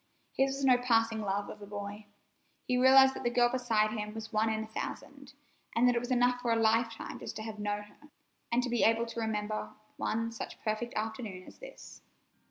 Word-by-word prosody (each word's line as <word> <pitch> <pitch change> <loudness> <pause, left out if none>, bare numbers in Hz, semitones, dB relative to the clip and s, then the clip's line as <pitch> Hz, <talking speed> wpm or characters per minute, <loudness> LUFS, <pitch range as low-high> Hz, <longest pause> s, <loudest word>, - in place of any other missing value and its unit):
His 270 0 +1
was 275 0 -2
no 250 -2 +5
passing 225 -2 +2
love 205 0 -1
of 210 - -10
a 205 - -9
boy. 205 +1 -7 0.6
He 250 - 0
realized 265 +1 +7
that - - -7
the 240 - +1
girl 240 0 +3
beside 230 -4 +1
him 210 -1 -4
was 220 0 -7
one 215 +1 +2
in 220 0 -1
a - - -9
thousand, 275 +5 -7 0.4
and 240 +2 +5
that 245 - +4
it - - +3
was 245 +1 -6
enough 245 0 +2
for 240 - 0
a - - +4
lifetime 225 0 +1
just - - -7
to 215 - -5
have 220 -1 -7
known 205 0 -2
her, 295 +8 -19 0.4
and 240 +1 +2
to 250 - -2
be 240 - +1
able 230 +1 +4
to 235 0 -6
remember 215 -1 -2 0.3
one 230 +1 -1
such 230 - -7
perfect 220 +2 -2
afternoon 215 -3 -4
as - - -15
this. - - -12
225 Hz, 215 wpm, -31 LUFS, 215-245 Hz, 0.6 s, realized